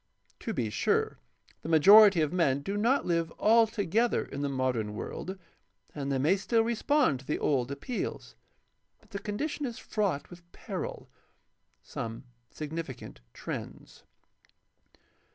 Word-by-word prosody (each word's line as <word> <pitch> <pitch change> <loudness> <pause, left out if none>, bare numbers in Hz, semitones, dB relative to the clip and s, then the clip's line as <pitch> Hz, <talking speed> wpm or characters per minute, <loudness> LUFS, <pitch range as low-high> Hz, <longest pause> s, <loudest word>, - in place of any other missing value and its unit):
To - - -4
be 110 -3 -2
sure, - - 0 0.4
the - - -6
majority 195 +3 +8
of 155 +1 0
men 145 -6 +2
do 200 +6 -3
not 235 +7 +2
live 165 -1 0
altogether 225 0 +2
in 140 - -6
the 145 - -1
modern 125 -6 -1
world, 190 - -6 0.6
and 140 -2 -3
they 135 - +1
may 155 +9 +3
still 225 +4 +1
respond 235 - +1
to 135 - -15
the 150 - 0
old 130 -4 0
appeals. 140 - -5 0.7
But - - -27
the 200 - -4
condition 280 +8 -3
is 235 - -7
fraught 195 -10 -2
with 175 0 -14
peril. - - -6 0.8
Some 115 +2 -6 0.3
significant 155 - -7
trends. - - -8
170 Hz, 135 wpm, -29 LUFS, 140-215 Hz, 0.8 s, majority